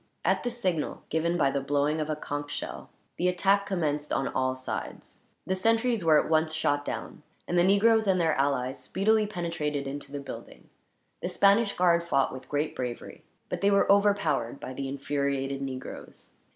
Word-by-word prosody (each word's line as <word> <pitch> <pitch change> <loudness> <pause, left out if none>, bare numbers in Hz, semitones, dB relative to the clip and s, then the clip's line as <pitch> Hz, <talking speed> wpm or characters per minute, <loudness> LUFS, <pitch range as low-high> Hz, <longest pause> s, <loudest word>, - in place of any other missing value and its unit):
At - - +2
the 245 - -1
signal, 185 -10 -2
given 170 +2 0
by 140 -4 +3
the 140 - -1
blowing 145 +3 0
of 155 - -3
a 155 - 0
conch 145 -1 -5
shell, 145 - -6 0.3
the 180 - +1
attack 195 +3 +2
commenced 150 -6 -1
on 135 - 0
all 130 0 0
sides. 130 0 -6 0.2
The 190 - 0
sentries 225 +2 +1
were 155 -2 +6
at - - -1
once 160 0 +2
shot 145 -2 +1
down, - - -6 0.3
and 175 - -1
the 175 - +5
negroes 220 +3 +4
and 190 -1 +3
their 165 -2 +2
allies 135 -1 0
speedily 215 +2 +2
penetrated 165 -7 -3
into 140 +1 -6
the 145 - -4
building. 140 - -10 0.5
The - - -2
Spanish 200 +2 +3
guard 170 -1 +3
fought 140 -5 +1
with 130 - -10
great 150 +1 -1
bravery, 125 -2 -5 0.3
but - - -4
they 200 - +4
were 200 0 +4
overpowered 170 - +2
by 130 - -7
the 135 +1 -4
infuriated 140 0 -2
negroes. 130 -1 -8
155 Hz, 180 wpm, -28 LUFS, 140-190 Hz, 0.5 s, were